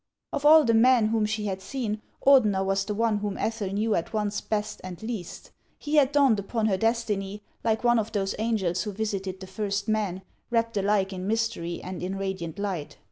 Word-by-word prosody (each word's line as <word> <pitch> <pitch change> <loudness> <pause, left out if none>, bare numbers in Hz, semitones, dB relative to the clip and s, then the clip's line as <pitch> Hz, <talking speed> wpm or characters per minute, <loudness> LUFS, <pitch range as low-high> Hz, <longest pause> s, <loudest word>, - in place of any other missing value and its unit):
Of 290 - +1
all 315 0 +8
the 230 - +2
men 230 -1 +5
whom 220 -1 +1
she 215 0 -2
had 190 -2 -3
seen, 220 -2 -3 0.2
Ordener 215 -9 +5
was 195 0 0
the 210 - -3
one 225 -1 +1
whom 205 -1 -3
Ethel 220 -3 -2
knew 215 +2 0
at 170 - -2
once 210 -1 -1
best 215 0 -3
and 185 -2 -7
least. 220 -7 -6 0.3
He 300 +1 -1
had 280 -2 +5
dawned 275 -7 +4
upon 215 +3 -2
her 205 -3 +2
destiny, 210 -2 -1 0.2
like 220 0 +1
one 240 -1 +4
of 220 0 -3
those 195 -3 -1
angels 205 -6 0
who 210 -1 -4
visited 195 -3 -3
the 190 - -8
first 200 +1 -3
men, 205 -4 -1 0.3
wrapped 230 -1 0
alike 200 -1 +1
in 185 0 -5
mystery 220 -6 -2
and 185 0 -6
in 185 +2 -3
radiant 190 -4 -4
light. 190 -7 -4
210 Hz, 200 wpm, -26 LUFS, 195-225 Hz, 0.3 s, all